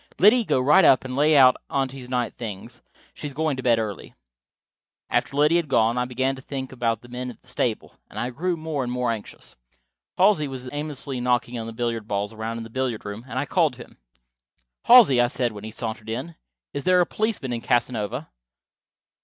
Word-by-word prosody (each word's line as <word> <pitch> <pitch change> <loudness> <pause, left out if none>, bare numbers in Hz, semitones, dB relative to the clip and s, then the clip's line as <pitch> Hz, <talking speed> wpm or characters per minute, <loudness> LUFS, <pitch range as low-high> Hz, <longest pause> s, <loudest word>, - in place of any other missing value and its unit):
Liddy, 225 +5 +6
go 135 - +1
right 150 +8 +5
up 130 - +5
and 130 -1 -5
lay 150 +2 +4
out 130 -2 +7
Aunty's 135 -2 -3
night 125 -2 -1
things. 115 +1 -8 0.3
She 150 - -6
is 140 - -9
going 155 -1 0
to - - -3
bed 120 -2 +3
early." 105 -4 -5 1.0
After 140 - 0
Liddy 150 +3 +4
had 170 -3 -1
gone 115 -3 +2
I 125 - 0
began 130 +2 -1
to 130 - -11
think 130 -1 -6
about 115 -3 -1
the - - -13
men 125 +1 -5
at 115 - -11
the - - -24
stable, 125 -3 -2 0.2
and - - -12
I 120 +1 -2
grew 175 +7 -2
more 155 -3 -3
and 120 - -4
more 125 -1 0
anxious. 110 -3 -8 0.6
Halsey 180 -6 +4
was 130 -2 -6
aimlessly 145 -3 -4
knocking 125 -1 0
the - - -6
billiard 115 -2 -3
balls 100 +1 -2
around 110 +1 -4
in 115 - -5
the 115 - -11
billiard 125 -4 -2
room, 105 +3 -7
and 125 - -5
I 135 - 0
called 160 -5 +2
to 120 - -9
him. - - -21 0.9
"Halsey," 220 - +8
I 120 - +3
said 125 -2 -1
when 105 0 -9
he - - -5
sauntered 110 -1 -5
in, 130 +9 -4 0.4
"is 140 - -4
there 185 0 +4
a 175 - +4
policeman 165 - -2
in 115 - -3
Casanova?" 120 +3 -1
125 Hz, 210 wpm, -24 LUFS, 115-145 Hz, 1.0 s, Halsey